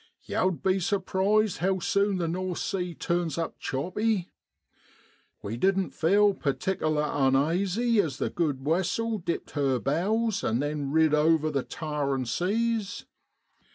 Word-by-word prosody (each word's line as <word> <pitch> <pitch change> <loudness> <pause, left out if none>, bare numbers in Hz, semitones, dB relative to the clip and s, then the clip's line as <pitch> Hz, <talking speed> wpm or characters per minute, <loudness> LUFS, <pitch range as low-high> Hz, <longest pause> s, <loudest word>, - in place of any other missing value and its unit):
Yow'd 185 -2 -1
be 190 0 +2
surprised 200 +1 +1
how 190 +3 +1
sune 200 +2 +1
the 170 -2 -1
North 180 +1 -3
Sea 180 -3 -3
turns 170 -3 -1
up 165 -1 -3
choppy. 185 +7 -1 1.1
We 110 +3 -4
didn't 190 +5 +1
feel 200 +5 +3
pertikerler 155 0 -1
unaisy 175 - +2
as 145 -7 -4
the - - -2
good 145 -6 -1
wessel 190 +7 0
dipped 170 -1 -4
her 140 -3 +1
bows 200 - 0
an' 110 - +1
then 145 +1 -2
rid 160 0 +3
over 155 0 +3
the 140 -2 0
towerin' 140 -4 -2
seas. 210 - -1
175 Hz, 130 wpm, -27 LUFS, 150-195 Hz, 1.1 s, feel